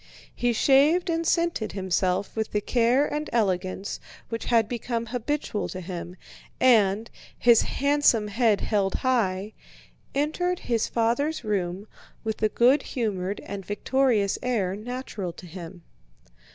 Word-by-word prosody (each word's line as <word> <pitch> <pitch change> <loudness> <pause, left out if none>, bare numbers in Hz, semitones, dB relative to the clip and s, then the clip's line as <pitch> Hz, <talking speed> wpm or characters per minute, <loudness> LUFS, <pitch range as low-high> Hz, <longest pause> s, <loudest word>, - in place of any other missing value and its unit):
He 245 0 0
shaved 290 - +4
and 330 0 -1
scented 335 -11 0
himself 185 0 -1
with 220 -1 -3
the 210 - +2
care 245 +5 +2
and 300 +1 -3
elegance 190 -3 -1 0.3
which 230 0 -4
had 230 -3 +3
become 235 0 -3
habitual 245 -1 -2
to 185 - -6
him 180 -1 -6 0.4
and, 220 -3 +4 0.3
his 235 -2 +5
handsome 280 -6 +2
head 220 -1 +2
held 200 -3 0
high, 215 -6 0 0.6
entered 355 +5 0
his 230 -2 0
father's 240 +7 0
room 195 -2 -2 0.4
with 220 -1 -2
the 215 - +1
good 255 +7 +4
humored 205 -7 -3
and 200 0 -7
victorious 210 +1 +1
air 205 -7 0
natural 220 -4 -5
to 180 - -12
him. 175 0 -10
225 Hz, 130 wpm, -26 LUFS, 195-255 Hz, 0.6 s, his